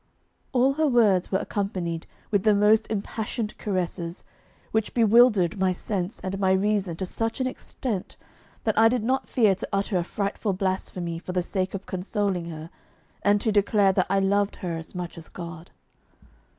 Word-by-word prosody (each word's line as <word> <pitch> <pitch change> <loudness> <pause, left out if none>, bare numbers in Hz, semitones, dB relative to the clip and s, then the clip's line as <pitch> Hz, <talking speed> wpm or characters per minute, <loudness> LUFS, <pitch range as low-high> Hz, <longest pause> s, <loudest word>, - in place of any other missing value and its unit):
All 260 +1 +3
her 310 +2 +2
words 215 -8 +3
were 190 - +3
accompanied 185 -5 -3 0.2
with 205 -2 +3
the 215 +1 +4
most 215 +2 +4
impassioned 215 +1 -3
caresses, 180 -3 -3 0.5
which 220 -1 -1
bewildered 220 -5 +5
my 190 -1 +3
sense 185 +1 -3
and 190 +1 -4
my 190 -1 +3
reason 195 -2 +1
to 190 - -3
such 225 +6 -3
an 260 - +1
extent, 245 -5 -4 0.5
that 220 - +1
I 225 0 +7
did 245 -2 0
not 260 +3 0
fear 220 -6 +4
to 190 - -5
utter 195 0 0
a 175 - +1
frightful 200 +2 -2
blasphemy 185 -3 -2
for 180 - -6
the 180 -1 +1
sake 190 +1 -2
of 195 - -6
consoling 190 -1 -2
her, 160 -1 -8 0.5
and 205 0 +3
to 220 - +1
declare 205 -1 +4
that 185 -1 +1
I 195 - +2
loved 200 +1 +1
her 175 -3 -4
as 165 +3 -8
much 175 -1 -5
as 160 - -12
God. 170 0 -8
195 Hz, 175 wpm, -26 LUFS, 180-215 Hz, 0.5 s, I